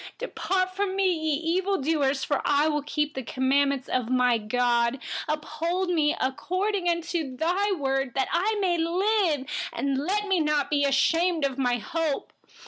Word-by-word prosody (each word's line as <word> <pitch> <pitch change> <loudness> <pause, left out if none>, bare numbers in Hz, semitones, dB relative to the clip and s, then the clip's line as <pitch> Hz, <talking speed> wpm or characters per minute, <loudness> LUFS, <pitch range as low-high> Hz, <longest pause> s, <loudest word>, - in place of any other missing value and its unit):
115Depart 370 -5 -1
from 385 0 -2
me, 385 -1 +2
you 320 +1 0
evildoers, 300 -7 0
that 290 - 0
I 290 +1 +3
may 300 -1 +1
keep 300 0 -1
the 265 - -4
commandments 270 +2 +1
of 250 -2 -1
my 250 -2 +3
God. 235 +2 +1 0.3
116Uphold 335 +4 -1
me 305 -3 +2
according 350 +5 -1
to 315 -7 -3
your 380 +4 +1
word, 270 -3 -1
that 265 - +1
I 405 +6 +1
may 355 -3 +1
live. 350 -3 +1 0.3
Let 280 +11 0
me 380 -3 +2
not 300 -2 0
be 285 -1 +2
ashamed 325 +4 +2
of 275 -1 -3
my 245 -2 +2
hope. 305 +5 -3
305 Hz, 150 wpm, -26 LUFS, 270-360 Hz, 0.3 s, I